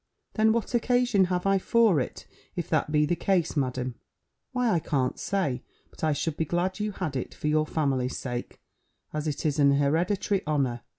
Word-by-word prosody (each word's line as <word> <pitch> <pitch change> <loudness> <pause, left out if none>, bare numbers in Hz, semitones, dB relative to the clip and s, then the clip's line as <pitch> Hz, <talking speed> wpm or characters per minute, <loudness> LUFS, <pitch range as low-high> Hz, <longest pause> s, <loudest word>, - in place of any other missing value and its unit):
"Then 220 0 +4
what 230 +1 -1
occasion 245 -4 +3
have 180 0 -1
I 195 0 +3
for 220 -5 +4
it, 125 - -4 0.3
if - - -3
that - - +1
be 150 0 +3
the 175 - +1
case, 175 -1 +1
Madam?" 130 -3 -1 0.6
"Why, 250 -3 +1
I 170 - +3
can't 135 -4 -1
say, 145 -11 -1 0.3
but - - -14
I 155 - +3
should 150 +1 -2
be 160 - 0
glad 180 +5 -1
you 210 0 -1
had 170 -7 -3
it, 130 - -4
for - - -4
your 155 0 +2
family's 135 -5 0
sake, 120 -2 -5 0.5
as 155 0 -2
it 150 0 -3
is 150 -1 +1
an 140 -1 +5
hereditary 175 +8 +1
honour. 135 -6 0
160 Hz, 190 wpm, -27 LUFS, 140-195 Hz, 0.6 s, an